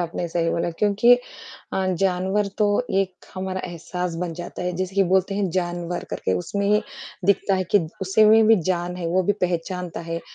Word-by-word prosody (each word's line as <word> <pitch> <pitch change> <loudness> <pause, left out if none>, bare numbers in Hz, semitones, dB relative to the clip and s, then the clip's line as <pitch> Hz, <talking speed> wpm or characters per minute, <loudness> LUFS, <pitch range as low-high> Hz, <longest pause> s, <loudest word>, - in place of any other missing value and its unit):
आपने 175 0 -2
सही 165 0 0
बोला, 170 +1 -1
क्योंकि 210 +4 +5 0.6
अ, 190 0 0
जानवर 190 +2 +1
तो 210 - +4 0.3
एक 185 -2 -5
हमारा 185 0 -3
एहसास 175 0 -4
बन 175 -2 -2
जाता 175 +1 -7
है, 180 0 -1
जैसे 185 +1 -3
कि 200 - +4
बोलते 190 +1 +2
हैं 200 -1 0
जान 175 -1 -1
वर 175 - -3
करके 95 - -1
उसमें 200 - 0 0.4
दिखता 200 0 +3
है 185 0 0
कि - - +9 0.2
उसे 195 +3 +4
में 220 +1 +6
भी 225 0 +7
जान 175 0 -2
है, 175 -2 -4
वो 185 +3 +2
भी 205 - +2
पहचानता 180 0 -2
है, 165 0 -4
185 Hz, 190 wpm, -23 LUFS, 175-200 Hz, 0.6 s, कि